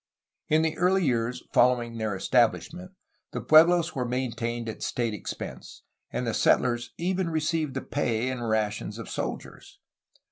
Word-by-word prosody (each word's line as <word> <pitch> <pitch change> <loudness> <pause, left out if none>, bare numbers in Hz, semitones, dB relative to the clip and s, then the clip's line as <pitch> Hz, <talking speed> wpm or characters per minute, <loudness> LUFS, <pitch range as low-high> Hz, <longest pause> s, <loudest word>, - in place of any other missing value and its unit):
In 155 +1 +3
the 160 -1 0
early 185 +1 +3
years 120 -1 -1
following 120 -1 +3
their 110 -3 -1
establishment, 145 - 0 0.4
the - - -2
puehlos 165 +2 +5
were 130 - -2
maintained 120 -2 -3
at 110 - -6
state 115 -3 -1
expense, 105 - -7 0.3
and 125 - -3
the 115 - -1
settlers 120 0 +2
even 185 0 -1
received 155 -2 -1
the - - -2
pay 120 -4 -1
and 120 -3 -3
rations 105 -1 -1
of - - -7
soldiers. - - -6
125 Hz, 145 wpm, -27 LUFS, 115-160 Hz, 0.4 s, puehlos